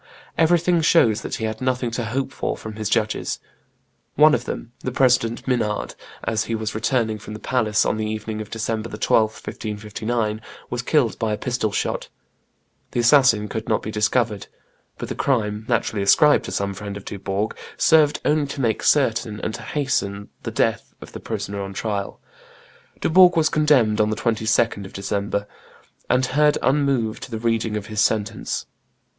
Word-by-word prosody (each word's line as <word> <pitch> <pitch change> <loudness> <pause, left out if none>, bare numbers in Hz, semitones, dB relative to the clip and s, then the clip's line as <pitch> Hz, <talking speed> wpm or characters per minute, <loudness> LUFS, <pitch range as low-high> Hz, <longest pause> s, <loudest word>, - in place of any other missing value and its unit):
Everything 170 +1 +3
shows 120 -9 +4
that - - -4
he 110 - -3
had 110 +1 -4
nothing 125 -2 0
to 120 0 -3
hope 135 +4 -2
for - - -3
from 110 -1 -8
his 110 -2 -2
judges; 110 -1 0 0.8
one 155 +1 +6
of - - 0
them, 115 - -6
the 130 - -4
President 125 -2 +2
Minard, 115 -5 -1 0.3
as 110 0 0
he 115 - -2
was 110 -1 -3
returning 110 -1 0
from 105 +1 -8
the - - -8
palace 110 -4 +1
on - - 0
the 110 0 -2
evening 110 0 -4
of 105 - -8
December 115 0 -3
12, 110 -1 +2
1559, 110 +1 -4 0.3
was 120 0 -1
killed 125 - +1
by 110 -1 0
a - - -2
pistol 120 -4 -1
shot; - - -2 0.8
the - - 0
assassin 120 -4 +5
could 110 +1 -5
not 110 - +1
be 110 - -4
discovered; 105 0 0 0.5
but - - -5
the - - -3
crime, 110 -4 -1
naturally 110 -3 0
ascribed 150 +9 +5
to - - -6
some 100 0 -1
friend 100 0 -6
of 100 - -11
Dubourg, 100 +2 -3 0.2
served 150 -2 +4
only 150 -1 +2
to 140 - -6
make 115 -4 0
certain 115 -6 +2
and 110 - -3
to 120 - -7
hasten 110 -7 -2
the - - -4
death - - -1
of - - -11
the - - -8
prisoner 100 0 -4
on 100 0 -6
trial. 100 -1 -3 0.8
Dubourg 180 +1 +6
was 160 -1 +4
condemned 130 -9 +3
on 105 - +2
the 110 - -1
22d 110 -2 +1
of 95 - -10
December, 100 +1 -2 0.6
and 125 +1 +3
heard 150 +3 +3
unmoved 135 -5 0
the 115 - -4
reading 115 -1 0
of 105 - -5
his 105 -1 -1
sentence. 110 0 -1
110 Hz, 175 wpm, -22 LUFS, 105-130 Hz, 0.8 s, one